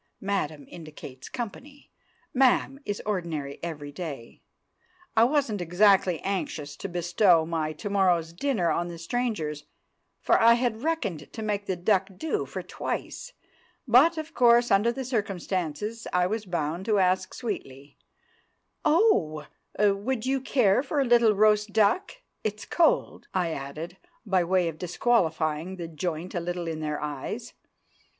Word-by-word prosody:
("Madam" 160 -8 -2
indicates 150 -5 -10
company; 265 +5 -7 0.4
"ma'am" 265 +1 +3
is 205 0 -3
ordinary 165 -9 -3
every 150 -4 -6
day.) 145 -7 -7 0.7
I 225 - +6
wasn't 255 -7 0
exactly 180 0 +3
anxious 155 -7 -3
to 195 - -5
bestow 175 -1 +3
my 160 -2 -2
to 155 +8 -7
morrow's 180 -5 +2
dinner 185 - 0
on 170 +2 0
the 170 -1 -7
strangers, 165 -7 -2 0.5
for - - +3
I 230 +1 +7
had 235 -2 -1
reckoned 245 - -2
to 220 - -6
make 205 -1 -2
the 190 - 0
duck 190 +2 +1
do 320 - -2
for - - -6
twice; - - -5 0.5
but, 280 +9 +6
of 315 +1 -5
course, 240 0 +5
under 205 +4 +4
the 265 +2 -5
circumstances, 205 - -3
I 180 0 +2
was 210 +2 -3
bound 170 +1 -2
to 215 -2 +2
ask 185 0 +1
sweetly, 140 - -6 0.8
"Oh, 300 - +3 0.3
would 210 +4 +1
you 265 0 0
care 245 -5 +3
for 290 +1 -2
a 275 - +3
little 235 -3 +5
roast 210 0 +3
duck? 220 - +2 0.3
It's 215 -1 -3
cold," 340 -2 +1
I 175 -3 +1
added, 155 +5 -6 0.3
by 190 -4 +2
way 180 0 +2
of 160 -1 -5
disqualifying 170 -4 0
the 170 -2 -6
joint 165 +1 -4
a 175 - -1
little 175 0 -4
in 160 -1 -3
their 150 -1 -3
eyes. 150 - -5
190 Hz, 145 wpm, -27 LUFS, 165-230 Hz, 0.8 s, I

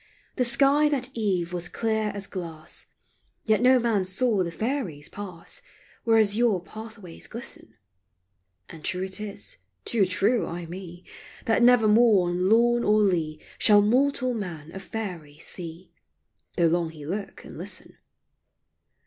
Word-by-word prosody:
The 250 - +1
sky 280 +4 +4
that 260 -3 -1
eve 185 -6 -1
was 175 0 -3
clear 220 +1 0
as 200 -1 -4
glass, 165 -5 -6 0.6
Yet 220 0 +3
no 255 +1 +6
man 230 -5 +1
saw 195 +3 +1
the 175 - -1
Faeries 185 - -3
pass 185 -5 -7 0.4
Where 225 -1 +5
azure 215 -1 +4
pathways 215 -1 -10
glisten; 220 - -8 0.9
And 160 -2 -12
true 185 0 -1
it 190 +1 -3
is 195 - -5
— 90 0 -49
too 205 -5 +2
true, 205 +6 +1
ay 170 0 -5
me 175 +1 -9 0.2
— - - -18
That 225 +2 +2
nevermore 225 -5 +5
on 180 +2 +1
lawn 240 +2 +4
or 215 +1 +4
lea 160 -6 0 0.2
Shall 205 -2 +6
mortal 255 +3 +2
man 170 -8 -6
a 195 - -7
Faery 180 -9 -6
see, 170 +1 -4 0.7
Though 170 - +4
long 165 0 +2
he 155 -2 -10
look 195 +5 -5
and - - -10
listen. - - -4
200 Hz, 150 wpm, -26 LUFS, 175-230 Hz, 0.9 s, no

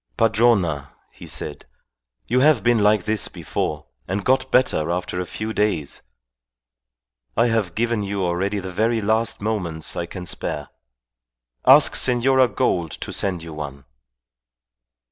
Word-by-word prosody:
"Padrona," 100 - +2 0.2
he - - -12
said, - - -6 0.6
"you 125 - +1
have 140 -5 +4
been 120 -1 +3
like 105 -1 +3
this 110 +2 0
before, - - -4 0.2
and 95 +2 -3
got 130 0 +2
better 125 -13 +2
after 90 +1 -2
a 90 - -5
few 110 +5 -5
days. 100 -9 -1 1.4
I 120 - +4
have 110 -6 -1
given 115 -1 0
you 100 -1 -2
already 95 +4 -1
the 95 -1 -5
very 115 +5 +1
last 110 +2 0
moments 85 -7 -2
I 85 - -3
can 90 0 -8
spare. 75 -4 -4 1.0
Ask - - +7
Senora 130 +1 +3
Gould 85 -6 0
to - - -6
send 90 -4 -2
you 80 -1 -8
one." 70 -2 -7
100 Hz, 140 wpm, -22 LUFS, 85-115 Hz, 1.4 s, Ask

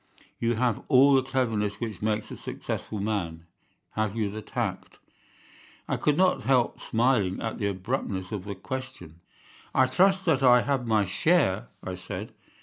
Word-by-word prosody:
You 115 0 +1
have 120 -1 0
all 140 0 +6
the 135 - +5
cleverness 115 -6 -1
which 110 -6 -5
makes 105 0 -1
a - - -5
successful 105 - -5
man. 90 -6 -3 0.5
Have 110 -1 -1
you 105 -3 -1
the 110 +1 -6
tact?' - - -4 0.9
"I - - 0
could 150 -1 +1
not 185 0 +3
help 130 -3 +1
smiling 115 -5 +1
at 115 +1 -4
the 100 - 0
abruptness 95 -1 -3
of 100 -3 -4
the 100 -1 -5
question. 130 - -7 0.6
"'I 130 - +6
trust 190 +8 +3
that 150 -6 +3
I 125 -2 +6
have 135 -3 -1
my 110 -2 +3
share,' 100 - +2 0.2
I 95 - -4
said. 95 +4 -7
110 Hz, 160 wpm, -27 LUFS, 100-130 Hz, 0.9 s, all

